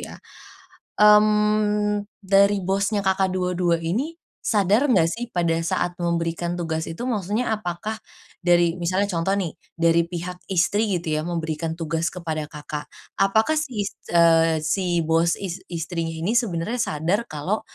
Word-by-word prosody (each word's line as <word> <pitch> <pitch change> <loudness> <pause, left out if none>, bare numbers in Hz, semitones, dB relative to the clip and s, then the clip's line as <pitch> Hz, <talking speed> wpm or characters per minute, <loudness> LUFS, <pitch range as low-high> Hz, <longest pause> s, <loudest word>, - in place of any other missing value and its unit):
ya. - - -8 0.8
Mmm, 210 0 +4 0.2
dari 200 0 +3
bosnya 200 +2 +1
Kakak, 190 0 +2
dua-dua 180 -2 0
ini 255 - -2 0.2
sadar 210 +6 +2
nggak 195 -10 +4
sih 240 +1 -4
pada 170 -1 +2
saat 175 +1 0
memberikan 170 0 -1
tugas 160 -1 -2
itu? 165 +9 -6
Maksudnya 215 +2 -1
apakah 215 +1 -4 0.4
dari 175 -1 +3
misalnya 185 +4 +1
contoh 175 +3 0
nih, 180 -6 -2 0.2
dari 165 0 +3
pihak 180 +1 -6
istri 195 +3 +2
gitu 170 -1 -5
ya, 155 - 0
memberikan 160 -1 -3
tugas 165 0 -1
kepada 160 -4 -4
Kakak, 150 0 -7 0.3
apakah 220 +8 +3
si 225 -7 -3
is 200 - -4 0.2
eee, 165 -1 +5
si 175 0 +1
bos 165 +1 +2
is 190 -2 -5
istrinya 165 -1 -3
ini 190 +7 0
sebenernya 230 0 0
sadar 170 +4 0
kalau, 155 +8 -2
180 Hz, 140 wpm, -23 LUFS, 165-210 Hz, 0.8 s, eee